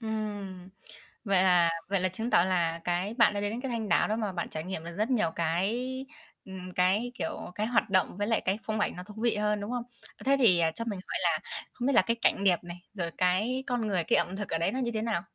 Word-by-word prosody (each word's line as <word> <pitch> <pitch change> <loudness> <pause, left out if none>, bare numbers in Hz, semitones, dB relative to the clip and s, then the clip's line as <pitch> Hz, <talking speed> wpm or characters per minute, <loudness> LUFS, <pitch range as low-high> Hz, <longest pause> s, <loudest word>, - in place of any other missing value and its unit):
Ừm. 205 -4 -5 0.6
Vậy 195 -4 +3
là 175 -2 +5 0.2
vậy 200 -2 +1
là 185 - +2
chứng 220 +6 -3
tỏ 170 - +5
là 170 -3 0
cái 180 +5 -1
bạn 230 -3 +5
đã 205 - -2
đến 205 0 -1
đến 235 +3 -4
cái 270 - -3
Thanh 225 -3 -3
Đảo - - +3
đó 215 - 0
mà 215 -3 -2
bạn 175 -2 -4
trải 155 0 -5
nghiệm 180 -3 -5
được 170 0 -8
rất 215 +3 0
nhiều 235 -10 +2
cái, 225 +11 -1 0.4
ừm, 185 -1 -8
cái, 200 +7 +2
kiểu, - - -4
cái 215 +1 -1
hoạt 235 -2 +1
động, 190 -1 +1
với 205 +1 -1
lại 225 - +2
cái 195 +3 -1
phong 215 -1 -2
ảnh - - 0
nó 180 - -7
thú 210 - -12
vị 235 -1 +2
hơn, 210 0 0
đúng 205 - -5
không? 245 -1 -2 0.3
Ơ, - - -12
thế 275 +1 +5
thì, 200 -9 +6
à, 165 -1 +3
cho 230 +8 -5
mình 205 -5 -3
hỏi - - -1
là 165 -3 +2 0.3
không 245 - -4
biết 275 - +2
là - - +7
cái 230 - -1
cảnh 200 - +2
đẹp 180 -3 +3
này, 175 0 -8 0.2
rồi 170 -4 -3
cái 210 +9 +1
con 245 -4 -1
người, 185 -4 +1
cái - - +3
ẩm 180 +3 0
thực 205 0 -5
ở 165 - 0
đấy 165 - 0
nó 260 - -3
như 240 -2 -1
thế 220 - -1
nào? 220 -6 -1
200 Hz, 275 wpm, -29 LUFS, 180-225 Hz, 0.6 s, là